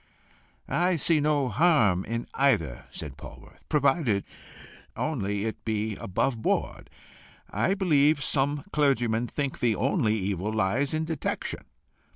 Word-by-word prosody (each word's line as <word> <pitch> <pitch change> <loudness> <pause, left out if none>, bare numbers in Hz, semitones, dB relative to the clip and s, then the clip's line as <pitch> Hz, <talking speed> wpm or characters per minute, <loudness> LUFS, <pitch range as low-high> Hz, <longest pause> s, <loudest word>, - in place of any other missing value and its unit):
"I 180 +1 +1
see 160 +1 +2
no 145 -2 +1
harm 115 - +3
in 115 +2 -3
either," 130 - +1
said 70 -4 -8
Polwarth, - - -13
"provided 135 - +2 0.7
only 105 -9 -2
it 110 - -5
be 110 -1 -2
above 110 +6 -1
board. - - -1 0.6
I 190 - +1
believe 150 -6 +3
some 140 +1 +1
clergymen 120 -5 +2
think 140 +2 -3
the 115 -3 +2
only 120 - +1
evil 100 0 -2
lies 110 +8 0
in 160 0 -1
detection. 160 -3 -3
130 Hz, 125 wpm, -27 LUFS, 105-150 Hz, 0.7 s, harm